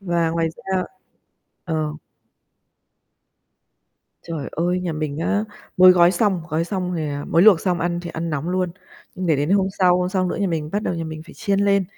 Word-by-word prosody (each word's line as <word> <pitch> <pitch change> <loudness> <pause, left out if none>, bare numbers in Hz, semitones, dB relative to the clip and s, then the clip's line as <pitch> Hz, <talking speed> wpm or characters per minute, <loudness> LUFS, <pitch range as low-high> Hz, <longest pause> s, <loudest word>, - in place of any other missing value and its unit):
Và 170 -3 0
ngoài 165 0 0
ra 190 +3 -3 0.8
ờ. 155 -3 -2 2.3
Trời 165 -4 -5
ơi, 175 +3 0
nhà 180 -3 -3
mình 150 -1 -3
á, 205 +5 0 0.3
mới 185 0 +8
gói 175 -1 +5
xong, 190 -2 +1
gói 160 +1 0
xong 180 -1 -3
thì, 160 - -2
à 145 0 -4
mới 165 +2 +4
luộc 195 -6 +7
xong 180 -3 0
ăn 175 0 -1
thì 175 - -6
ăn 165 +1 -4
nóng 150 +2 -3
luôn, 185 0 0 0.4
nhưng 185 0 -4
để 160 -3 +3
đến 145 +4 -1
hôm 195 -1 +3
sau, 180 -1 +4
hôm 180 0 0
sau 185 -1 0
nữa - - -3
nhà 200 - 0
mình 160 -4 -2
bắt 205 +1 -1
đầu 180 - -1
nhà 165 -1 -4
mình 155 -1 -7
phải 170 - -15
chiên 200 -3 0
lên, 200 -1 +3
175 Hz, 205 wpm, -21 LUFS, 160-185 Hz, 2.3 s, mới